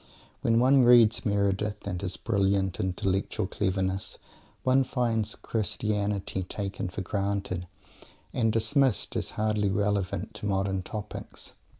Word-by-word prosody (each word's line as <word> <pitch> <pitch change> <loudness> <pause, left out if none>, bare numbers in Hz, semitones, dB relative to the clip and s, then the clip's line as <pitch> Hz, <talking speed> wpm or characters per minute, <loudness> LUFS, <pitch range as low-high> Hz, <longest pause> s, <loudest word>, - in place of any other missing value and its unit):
When 115 0 +3
one 130 +3 +5
reads 120 -2 +6
Meredith, 100 +1 0
with 90 -3 -3
his 95 -2 -3
brilliant 100 -3 +1
intellectual 95 +3 -1
cleverness, 95 0 -2 0.5
one 130 +1 +4
finds 115 -4 -1
Christianity 105 -3 -2
"taken 95 0 -4
for 90 - -5
granted," 100 -2 -2 0.7
and 115 -3 +2
dismissed 115 - +2
as - - -1
hardly 105 -1 +1
relevant 100 -1 -1
to 105 - -5
modern 95 -1 0
topics. 105 +3 -7
100 Hz, 115 wpm, -28 LUFS, 95-110 Hz, 0.7 s, reads